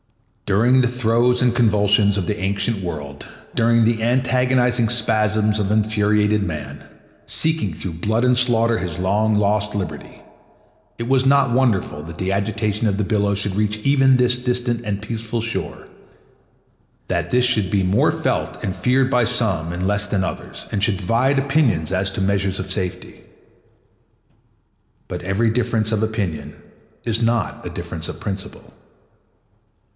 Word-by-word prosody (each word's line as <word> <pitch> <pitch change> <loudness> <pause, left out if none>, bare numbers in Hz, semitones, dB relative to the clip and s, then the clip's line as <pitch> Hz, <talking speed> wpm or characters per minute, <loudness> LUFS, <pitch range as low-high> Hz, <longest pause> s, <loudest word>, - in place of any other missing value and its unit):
During 120 +6 +4
the 125 - +2
throes 125 0 +1
and 120 -2 +2
convulsions 105 -2 +3
of 95 - -1
the 105 +4 -2
ancient 100 +2 -1
world, 75 -5 -6 0.3
during 115 0 +3
the 115 0 +1
agonizing 125 -1 +2
spasms 110 -2 +1
of 100 -1 -1
infuriated 105 -1 +2
man, 75 -5 -6 0.4
seeking 160 - 0
through 85 +3 -6
blood 110 +3 +1
and 125 0 +4
slaughter 115 -2 +2
his 85 -2 -4
long 105 +4 +1
lost 105 0 0
liberty, 100 -3 -6 0.8
it 115 - -4
was 130 0 +2
not 140 -2 +4
wonderful 115 - +1
that 80 0 -9
the 95 0 -2
agitation 105 +2 -1
of 100 -2 0
the 105 - 0
billows 100 -1 0
should 100 -1 -1
reach 105 +1 0
even 135 -2 +4
this 125 0 +3
distant 125 -1 -2
and 100 -1 -3
peaceful 115 +1 -4
shore; 115 +1 -5 1.2
that - - -2
this 125 0 +3
should 105 -6 +1
be 100 -1 +1
more 95 +3 +2
felt - - -2
and 95 - -2
feared 125 +7 +2
by 125 -2 +2
some 110 -9 0
and 90 +2 -2
less 105 0 +1
by 100 - -1
others, 95 -1 -4
and 100 - -1
should 100 -2 +2
divide 115 +9 +1
opinions 135 - +1
as 95 +1 0
to 95 - -5
measures 95 0 0
of 95 - -3
safety. 90 -1 -4 1.9
But - - -5
every 100 +5 0
difference 110 -2 0
of 110 - 0
opinion 100 -9 -3 0.5
is 115 0 0
not 115 -1 -1
a - - -4
difference - - -6
of - - -7
principle. 95 -1 -7
110 Hz, 155 wpm, -20 LUFS, 100-120 Hz, 1.9 s, During